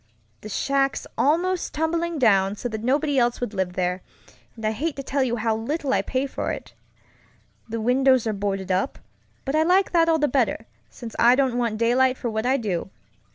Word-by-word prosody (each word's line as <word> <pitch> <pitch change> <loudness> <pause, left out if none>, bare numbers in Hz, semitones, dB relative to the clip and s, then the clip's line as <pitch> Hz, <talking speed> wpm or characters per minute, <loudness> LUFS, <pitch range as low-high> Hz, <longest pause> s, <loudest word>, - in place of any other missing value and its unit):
The 215 - -8
shack's 275 +5 0
almost 350 +5 +1
tumbling 330 +2 -1
down, 200 -6 +3
so 245 - -4
that 220 -1 -5
nobody 280 +2 +1
else 240 0 +1
would 245 -3 -4
live 190 -2 -2
there, 180 0 -1 0.5
and 225 -2 -7
I'd 215 - +2
hate 300 +7 -2
to 275 - -6
tell 275 +1 -1
you 245 -3 +1
how 225 -1 0
little 270 +5 -2
I - - +2
pay 260 +1 -2
for 275 - -3
it. - - -7 1.0
The 230 +1 -3
windows 255 +2 +3
are 220 - 0
boarded 195 -1 -3
up, 190 +9 0 0.5
but 270 - -2
I 310 - +4
like 365 +4 +3
that 330 -1 +3
all 325 - +4
the 300 -1 +2
better, 245 -4 0 0.2
since 235 -3 -9
I 240 +2 +6
don't 265 -2 +1
want 230 -3 -1
daylight 255 +3 +2
for 235 - -3
what 220 +2 -2
I 265 +2 +3
do. 195 -8 -3
250 Hz, 200 wpm, -24 LUFS, 220-280 Hz, 1.0 s, I